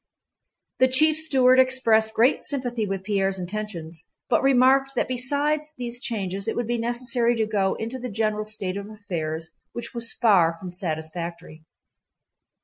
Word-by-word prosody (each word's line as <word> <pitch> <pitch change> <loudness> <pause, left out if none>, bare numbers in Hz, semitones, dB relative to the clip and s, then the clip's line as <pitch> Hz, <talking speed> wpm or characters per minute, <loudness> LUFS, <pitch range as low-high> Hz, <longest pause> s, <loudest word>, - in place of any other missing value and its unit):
The 260 - +6
chief 305 +5 +5
steward 265 -5 +4
expressed 230 -4 +3
great 240 +5 +3
sympathy 245 -6 -2
with 195 -1 -4
Pierre's 195 -1 0
intentions, 175 -4 -6 0.2
but - - +3
remarked 270 +1 +3
that - - 0
besides 290 +4 -1
these 245 -1 -5
changes 200 -5 -4
it - - -1
would 240 - -1
be 240 +1 -2
necessary 240 0 +1
to 225 -1 0
go 200 -3 0
into 230 +4 -5
the 250 0 -5
general 215 0 -1
state 200 -3 -4
of 200 +1 -7
affairs 165 -7 -5 0.2
which 235 +1 -7
was 235 -1 -2
far 185 -8 +3
from 180 +2 -9
satisfactory. 165 -1 -5
220 Hz, 150 wpm, -24 LUFS, 190-255 Hz, 0.2 s, The